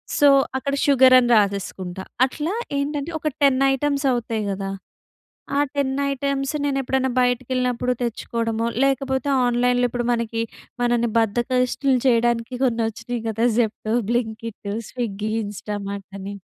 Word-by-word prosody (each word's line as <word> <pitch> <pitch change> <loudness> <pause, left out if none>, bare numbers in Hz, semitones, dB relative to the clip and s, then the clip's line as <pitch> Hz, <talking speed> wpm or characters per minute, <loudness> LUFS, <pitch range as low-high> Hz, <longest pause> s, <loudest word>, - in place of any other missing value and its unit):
So, 290 - +5 0.3
అక్కడ 280 +1 -2
sugar 265 -2 +6
అని 245 -1 +3
రాసేసుకుంటా. 190 -3 -1 0.2
అట్లా 305 +7 -3 0.2
ఏంటంటే, 290 +3 -2
ఒక 310 - -3
10 275 -2 +4
ఐటెమ్స్ 280 +1 0
అవుతయి 230 -3 -1
కదా! 195 0 -4 0.9
ఆ - - +3 0.2
10 275 -2 0 0.2
ఐటెమ్స్ 275 +1 -1
నేను 275 -1 0
ఎప్పుడన్నా 265 0 0
బయటికెళ్ళినప్పుడు 250 0 0
తెచ్చుకోవడమో, 230 0 -2 0.2
లేకపోతే 270 0 0 0.2
ఆన్‍లైన్‍లో 245 0 +2
ఇప్పుడు 240 -1 -2
మనకి, 230 -1 -1 0.4
మనని 240 -1 +2
బద్ధకస్తుల్ని 250 +4 +1
చేయడానికి 235 0 +2
కొన్ని 235 -2 +1
వచ్చినాయి 235 +2 -5
కదా! 225 +2 0
జెప్టో, 220 -1 -1 0.2
బ్లింకిట్, 225 -3 -3 0.2
స్విగ్గీ, 215 -3 -3
ఇంస్టామార్ట్ 200 -1 -5
అని. 200 +1 -6
240 Hz, 125 wpm, -22 LUFS, 225-265 Hz, 0.9 s, sugar